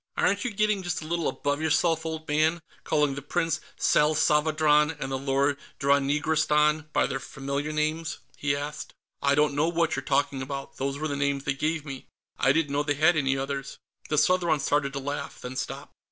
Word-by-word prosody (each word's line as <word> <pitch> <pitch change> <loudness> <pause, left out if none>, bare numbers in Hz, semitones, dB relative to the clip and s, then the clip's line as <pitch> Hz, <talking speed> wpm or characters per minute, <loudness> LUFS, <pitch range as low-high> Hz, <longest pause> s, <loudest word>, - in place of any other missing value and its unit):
"Aren't 200 +2 +2
you 250 - -1
getting 210 -2 +1
just 175 -3 -3
a - - -8
little 170 +1 -1
above 145 +1 -1
yourself, 160 +1 +1
old 160 0 -5
man, 155 +2 +1 0.2
calling 150 -2 +1
the 145 - -5
Prince 165 +2 -1 0.2
Salsavadran 150 0 +3
and 135 -2 -4
the 135 - 0
Lord 140 +1 +1 0.2
Dranigrastan 150 +2 +2
by 145 - +2
their 135 0 -2
familiar 140 +3 -4
names?" 155 +2 -1 0.2
he 140 -1 0
asked. 145 +1 -6 0.3
"I 140 0 +3
don't 150 0 +3
know 145 +3 +2
what 170 -1 +1
you're 135 - -2
talking 140 -1 0
about. 135 0 -6
Those 135 +1 -2
were 155 +2 -2
the 145 - -2
names 140 -1 0
they 140 - 0
gave 155 +2 -2
me; 135 -3 -8 0.3
I 135 - +4
didn't 145 0 +1
know 145 +1 +1
they 145 -1 0
had 160 +4 +4
any 135 -3 +1
others." 135 0 -4 0.3
The 150 - 0
Southron 170 -1 +3
started 140 0 +1
to 140 - -3
laugh, 140 +1 -5
then 125 +1 -7
stopped. - - -5
150 Hz, 195 wpm, -27 LUFS, 140-160 Hz, 0.3 s, I